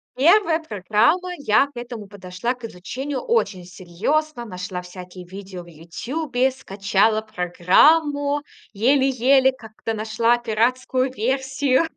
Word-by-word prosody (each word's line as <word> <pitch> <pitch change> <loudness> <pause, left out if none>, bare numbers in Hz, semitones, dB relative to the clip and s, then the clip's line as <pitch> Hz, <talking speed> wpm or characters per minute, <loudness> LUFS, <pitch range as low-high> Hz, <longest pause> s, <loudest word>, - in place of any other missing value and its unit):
1 335 +3 +4
программа. 230 - +1
Я 275 0 +3
к - - -21
этому 235 -4 -7
подошла 200 +4 -4
к 245 -2 -20
изучению 260 +9 -5
очень 460 - -1
серьёзно. 235 - -2
Нашла 180 -2 -6
всякие 180 0 -11
видео 190 -1 -9
в - - -18
"Ютубе", 245 - -2
скачала 205 -1 0
программу, 285 - +2 0.3
еле-еле 265 +3 +3
как-то 225 -2 -7
нашла 220 +2 +1
пиратскую 255 +3 0
версию 265 +4 0
235 Hz, 110 wpm, -22 LUFS, 195-275 Hz, 0.3 s, 1